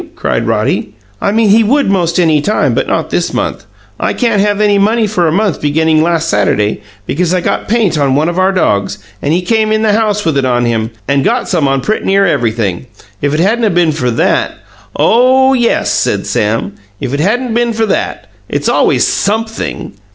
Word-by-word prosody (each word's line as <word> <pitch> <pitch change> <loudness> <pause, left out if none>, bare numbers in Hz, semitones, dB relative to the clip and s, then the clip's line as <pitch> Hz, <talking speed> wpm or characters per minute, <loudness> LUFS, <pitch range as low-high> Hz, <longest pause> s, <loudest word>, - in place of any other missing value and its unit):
cried - - -2
Roddy. - - -1 0.3
"I 200 - +1
mean 220 0 +2
he 225 +2 +5
would 275 +6 +1
most 175 -3 0
any 160 -4 +3
time, 210 +8 0
but - - -1
not - - -2
this - - -1
month. - - -3 0.3
I - - -1
can't 230 -5 +1
have 205 0 0
any 205 -1 +3
money 220 +3 +2
for 185 -5 0
a - - +1
month 200 0 0
beginning 155 +1 +2
last 165 0 0
Saturday, 105 -4 0 0.2
because 175 - -1
I - - +1
got - - -2
paint 210 -8 +1
on 135 -2 +1
one 150 +3 +1
of 175 +1 -2
our 190 +1 +3
dogs, 100 - 0 0.2
and 145 - -1
he 175 +3 +1
came 220 +2 +1
in 215 0 +1
the 215 -1 +2
house 210 -2 0
with 155 -4 +1
it - - -1
on 120 -1 +1
him, 115 -1 -1 0.2
and 140 0 +1
got 240 - 0
some 160 -6 0
on 135 0 0
pretty 215 +11 -2
near 195 +1 +3
everything. 110 - -1 0.3
If 145 +1 0
it - - -1
hadn't 225 +7 +1
'a' - - +2
been 175 -3 +2
for 130 -5 -2
that 115 - 0 0.2
" 100 +1 -29
"Oh, 255 - +3
yes!" 240 -3 +1
said - - 0
Sam. 105 -2 -1 0.3
"If 125 - -4
it 140 - -1
hadn't 235 +9 0
'a' - - -2
been 235 0 0
for 225 0 0
that! - - -2 0.2
It's - - -2
always - - +2
SUMPTHING!" 220 +2 -2
180 Hz, 215 wpm, -12 LUFS, 140-220 Hz, 0.3 s, he